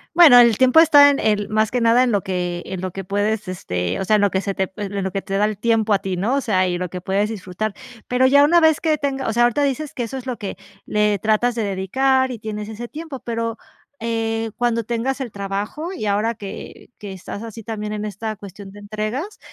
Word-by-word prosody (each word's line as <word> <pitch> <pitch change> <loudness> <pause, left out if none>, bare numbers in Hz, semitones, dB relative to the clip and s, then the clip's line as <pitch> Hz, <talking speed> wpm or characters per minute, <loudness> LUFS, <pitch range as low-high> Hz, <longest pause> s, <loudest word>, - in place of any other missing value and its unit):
Bueno, 325 -8 +9
el 235 -3 +6
tiempo 260 +4 +5
está 290 -3 +8
en 280 - +1
el 205 -1 +1
más 215 0 +1
que 245 -1 -1
nada 230 +2 +5
en 245 - +1
lo 205 - +1
que 180 -2 -3
en 185 -1 -5
lo 185 -1 -4
que 195 +1 -6
puedes, 205 +2 -1
este, 90 - -3
o 190 - -2
sea, 215 - +3
en 210 - +3
lo 205 -1 +2
que 190 - 0
se 195 - -3
te 190 -1 -2
en 200 -1 -3
lo 190 - -2
que 195 - -3
te 195 +1 -3
da 210 - +3
el 215 -1 -2
tiempo 220 0 +1
a 195 - +3
ti, 190 -1 -3
¿no?, 225 +9 0
o 280 - +1
sea, 185 -5 +1
y 175 - -1
lo 180 0 -4
que 180 +1 -7
puedes 200 +3 0
disfrutar, 200 0 -4 0.3
pero 250 +1 +2
ya 285 +2 +6
una 340 +4 +5
vez 320 -2 +4
que 310 -2 +1
tenga 275 -2 -2
o 225 - 0
sea, 240 +2 +3
ahorita 245 +4 +2
dices 285 +2 -2
que 245 - -3
eso 250 +4 -5
es 255 - -8
lo 250 -2 -4
que, 200 -4 -6 0.3
le 210 -1 +1
tratas 220 +4 +1
de 230 - -1
dedicar 260 +7 +1
y 235 - -6
tienes 210 0 -6
ese 230 +2 -7
tiempo, 305 -2 -8
pero, 230 -1 -3 0.4
eh, 225 -1 -2
cuando 235 -1 0
tengas 240 +5 -2
el 245 -5 -5
trabajo 200 - -4
y 215 - -5
ahora 210 +3 0
que 200 -1 -9
que 200 -2 -7
estás 190 +3 -8
así 225 0 -9
también 210 -1 -5
en 210 0 -4
esta 215 +2 -5
cuestión 195 0 -11
de 205 - -12
entregas, 215 - -4
215 Hz, 250 wpm, -21 LUFS, 200-245 Hz, 0.4 s, Bueno